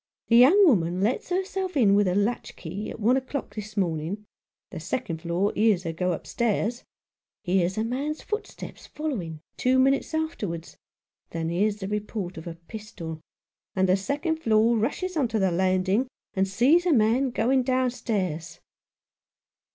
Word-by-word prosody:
The 230 - +6
young 340 +12 +7
woman 180 - +2
lets 225 - 0
herself 375 -1 -2
in 210 -7 +5
with 205 -1 +4
her 180 - +1
latch 205 +4 -1
key 185 +5 -6
at - - -8
one 235 +5 +3
o'clock 265 +1 -4
this 215 0 -8
morning 175 +3 -1 0.2
— - - -68
the - - -6
second 165 -11 -3
floor 175 +4 0
hears 210 -4 +3
her 165 - -3
go 180 +2 0
upstairs 235 +5 -1 0.3
— - - -68
hears 185 0 +1
a 220 - +1
man's 275 +6 -3
footsteps 425 +1 -6
following, 195 - -4 0.2
two 255 +1 +2
minutes 270 +4 +2
afterwards, 205 - -3 0.5
then 165 -1 -3
hears 200 +5 +1
the 190 - -3
report 210 -3 -3
of 160 - -8
a 165 - -5
pistol, 170 -3 -8 0.5
and 190 0 +3
the 185 - +4
second 285 - -1
floor 225 -4 +3
rushes 300 - -1
on 285 -6 +2
to 225 -1 -1
the 190 -3 +2
landing 185 +6 +1 0.3
and 190 0 +1
sees 270 - +3
a 340 - +4
man 240 +3 +3
going 255 +2 +2
downstairs." 225 - -1
215 Hz, 165 wpm, -26 LUFS, 185-260 Hz, 0.5 s, young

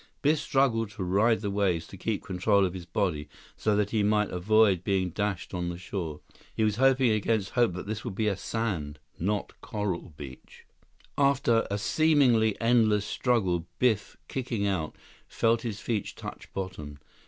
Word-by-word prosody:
Biff 150 +1 +3
struggled 115 -5 +1
to 105 -2 -6
ride 105 +5 +2
the 100 -2 -2
waves, 95 -5 +1
to - - -11
keep 105 +2 -3
control 100 +2 +2
of 90 - -2
his 90 -2 -8
body 85 -6 -1 0.3
so 105 -1 +1
that 105 0 +1
he 110 - +2
might 105 0 +2
avoid 100 0 +3
being 95 -2 0
dashed 100 0 -3
on 90 -1 -2
the 85 - -5
shore. 85 -4 -5 0.3
He 110 - +1
was 105 -1 +1
hoping 130 -2 +4
against 110 -1 0
hope 120 -6 +2
that 90 - -6
this 110 +2 -4
would 115 -6 -5
be 110 +1 0
a 100 - +1
sand, 95 -7 -3 0.2
not 100 +4 -1
coral 105 -7 -3
beach. 65 -3 -11 0.5
116 145 - +3 0.4
After - - -9
a 100 - 0
seemingly 120 -4 +3
endless 110 -3 +3
struggle, 95 -11 0
Biff, 110 -5 +1
kicking 120 -6 -2
out, 90 -6 -1 0.3
felt 115 0 +1
his 110 -4 -4
feet 110 -1 -2
touch - - -9
bottom. 95 -7 -6
105 Hz, 175 wpm, -28 LUFS, 90-115 Hz, 0.5 s, hoping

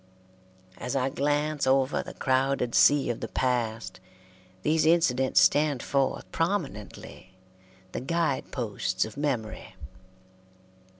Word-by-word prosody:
As 125 +2 -4
I 135 0 +1
glance 145 +1 0
over 135 +1 +2
the - - -10
crowded 130 -2 0
sea 145 -4 +4
of 120 - -6
the - - -4
past, 115 -6 -2 0.6
these 160 +1 +2
incidents 135 -6 +3
stand 145 -3 +3
forth 135 -1 0
prominently, 135 - -4 0.6
the - - -4
guide 160 0 -1
posts 105 -6 -2
of 110 - -10
memory. 125 -9 -3
135 Hz, 110 wpm, -27 LUFS, 120-145 Hz, 0.6 s, sea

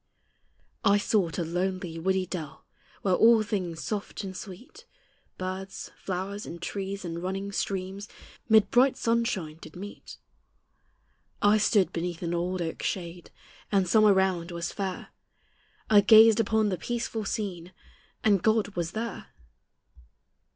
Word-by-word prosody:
I 200 +1 +5
sought 205 -5 0
a 175 - 0
lonely, 180 0 -3
woody 190 +2 +1
dell, 165 -6 -7 0.4
Where 190 - +2
all 225 +3 +6
things 185 -6 -3
soft 210 0 -4
and 190 -1 -6
sweet, 255 - -10 0.5
Birds, 185 +1 -5
flowers, 195 +2 -5
and 170 - -7
trees, 195 +1 -4
and 170 0 -4
running 195 +2 -3
streams, 195 +1 -3 0.4
Mid 220 -2 +5
bright 255 +2 +4
sunshine 230 -9 -1
did - - -12
meet: 200 +3 -9 1.2
I 205 +1 +4
stood 205 -2 +3
beneath 170 0 -3
an 170 0 -2
old 175 +1 -1
oak's 160 - -3
shade, 175 -2 -5 0.4
And 195 -3 +2
summer 215 +3 +5
round 190 -3 +1
was 170 -1 -4
fair; 190 -2 -4 0.8
I 205 -2 +6
gazed 220 +1 +7
upon 220 -1 +2
the 185 -3 -2
peaceful 235 +1 -3
scene, 190 -5 -4 0.5
And 200 -4 +4
God 220 0 +2
was 175 -3 -4
there! 225 -1 -5
190 Hz, 135 wpm, -27 LUFS, 180-215 Hz, 1.2 s, gazed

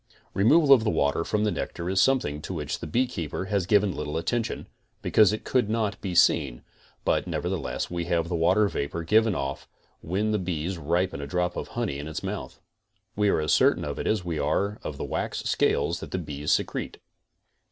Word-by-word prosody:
Removal 140 - +6
of 120 -5 +5
the 110 - +1
water 70 -2 +1
from 105 +4 0
the 105 - +2
nectar 85 -1 -4
is 95 +1 +2
something 120 - +1
to 95 - -5
which 75 -3 -3
the - - -6
beekeeper 105 - -1
has 95 -2 -1
given 105 -2 +3
little 75 +1 -3
attention, 115 +7 -2 0.4
because 110 -2 +5
it 110 - -4
could 125 -5 +1
not 110 -2 -1
be 95 -3 -4
seen, 70 -8 +3 0.4
but - - +1
nevertheless - - -3
we 85 -1 -2
have 85 -1 0
the 85 - -2
water 85 +6 +3
vapor 85 -1 -3
given 110 +3 +3
off 70 -1 -4 0.3
when 100 +6 -1
the 105 - +1
bee 90 0 -2
ripens 85 0 -1
a 70 - -5
drop 90 +3 -1
of - - -4
honey 105 -12 -1
in 75 - -6
his 80 - -5
mouth. - - -5 0.6
We 105 0 +2
aré 80 - +2
as 75 - +2
certain - - +3
of - - -4
it - - -3
as 105 -5 0
we 85 -3 -2
are 100 +9 0
of 75 - -6
the - - -4
wax - - -3
scales - - +1
that - - -8
the - - -3
bees 75 -4 -3
secrete. - - -1
90 Hz, 205 wpm, -26 LUFS, 80-105 Hz, 0.6 s, Removal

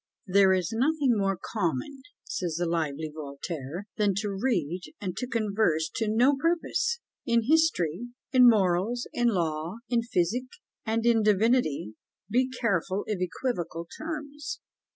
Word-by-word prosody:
"There 195 0 +5
is 185 0 +1
nothing 270 +1 +2
more 195 -2 +1
common," 205 - -3 0.2
says 175 -4 -3
the 175 +2 0
lively 160 -2 -2
Voltaire, 150 +3 -6
"than 205 -3 +2
to 205 +1 -1
read 185 - 0 0.2
and 185 -3 -4
to 250 - -2
converse 205 -9 +1
to 225 - 0
no 245 +6 +4
purpose. 345 - 0 0.3
In 235 -1 +3
history, 245 - +2 0.2
in 250 -2 +8
morals, 205 +3 +2
in 240 0 +2
law, 165 -4 -1
in 240 -2 +2
physic, 230 +2 0 0.4
and 225 +1 0
in 235 -2 +4
divinity, 210 - +2 0.3
be 255 +4 +2
careful 200 -6 0
of 210 -4 -2
equivocal 175 -4 -3
terms." 295 -2 -5
210 Hz, 135 wpm, -28 LUFS, 175-245 Hz, 0.4 s, in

